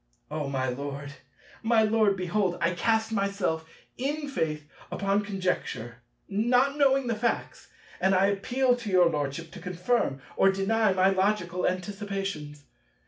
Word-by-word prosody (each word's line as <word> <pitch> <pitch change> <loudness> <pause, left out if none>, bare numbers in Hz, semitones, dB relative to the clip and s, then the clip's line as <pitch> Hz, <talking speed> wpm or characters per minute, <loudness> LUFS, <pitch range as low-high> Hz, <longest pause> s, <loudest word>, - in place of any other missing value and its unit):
O, 150 -2 -2
my 130 -1 -1
Lord, 140 +2 -5 0.5
my 225 -1 +3
Lord, 215 -2 +3
behold, 185 0 0
I 170 - +2
cast 220 +4 +1
myself 195 -6 -1 0.3
in 290 +3 -2
faith 155 - -2 0.2
upon 200 +1 +1
conjecture, 180 - -3 0.3
not 245 +7 +2
knowing 275 -2 +3
the 235 - 0
facts; 230 +2 -2 0.3
and 190 0 +3
I 190 +1 +4
appeal 245 +6 +2
to 230 -3 -6
your 180 -3 +5
Lordship 150 +2 -3
to - - -10
confirm 180 - -1 0.2
or 195 - +5
deny 205 +2 +2
my 190 +1 +4
logical 190 -2 +1
anticipations. 195 -6 -4
195 Hz, 140 wpm, -27 LUFS, 170-220 Hz, 0.5 s, your